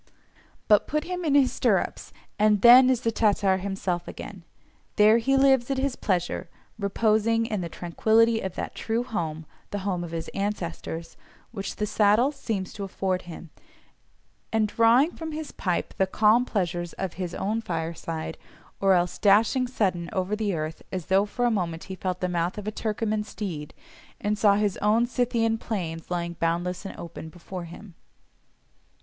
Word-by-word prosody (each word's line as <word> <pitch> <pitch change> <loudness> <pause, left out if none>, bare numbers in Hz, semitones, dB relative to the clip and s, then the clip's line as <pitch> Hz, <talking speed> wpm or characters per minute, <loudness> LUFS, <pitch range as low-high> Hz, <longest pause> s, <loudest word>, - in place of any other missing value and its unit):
But 210 -1 +5
put 305 +1 -1
him 360 0 -4
in 295 -4 +2
his 275 -3 +5
stirrups, - - 0 0.3
and 210 -1 +3
then 250 +2 +9
is 255 -3 +2
the 230 - 0
Tatar 205 -3 +2
himself 185 -2 -3
again: 195 -3 -8 0.5
there 215 +2 +6
he 270 +4 +2
lives 270 -2 +4
at 270 - 0
his 265 -1 0
pleasure, 180 -2 -1 0.3
reposing 220 +2 +2
in 215 -4 -2
the 170 - -4
tranquillity 225 +7 +2
of 190 -2 -5
that - - -4
true 230 +2 -2
home 160 -9 -4 0.2
(the 205 -1 -5
home 180 -3 -1
of 170 - -6
his 165 0 -5
ancestors) 175 -4 -4 0.3
which 195 -4 -5
the 210 - -1
saddle 215 +5 +3
seems 220 -10 -4
to 200 - -6
afford 190 -1 -2
him, 165 -1 -9 1.0
and 220 -1 +2
drawing 235 +9 +4
from 320 -2 -7
his 310 -1 -5
pipe 180 -3 -2
the 190 - +3
calm 220 +5 +4
pleasures 175 -6 -2
of 190 -3 -4
his 175 -2 -4
"own 215 +3 -1
fireside," 165 -4 -4 0.4
or 195 -1 +4
else 175 0 +1
dashing 220 +5 +4
sudden 185 -8 -1
over 195 0 -1
the 210 -3 -1
earth, 155 0 -4
as 185 -4 -4
though 195 +2 +3
for 245 +4 -1
a 240 - +3
moment 170 -6 -2
he 190 - -7
felt 185 0 -3
the 180 - +1
mouth 175 +2 -1
of 210 - -6
a - - 0
Turcoman 215 0 -2
steed, 175 -9 -6 0.5
and 210 +1 0
saw 205 -1 +4
his 205 -2 0
own 220 +3 +3
Scythian 235 -2 0
plains 165 -8 -4
lying 170 -1 -2
boundless 175 +3 -1
and 195 - -7
open 170 -1 -8
before 175 +1 -8
him. 175 +3 -11
205 Hz, 170 wpm, -26 LUFS, 175-225 Hz, 1.0 s, then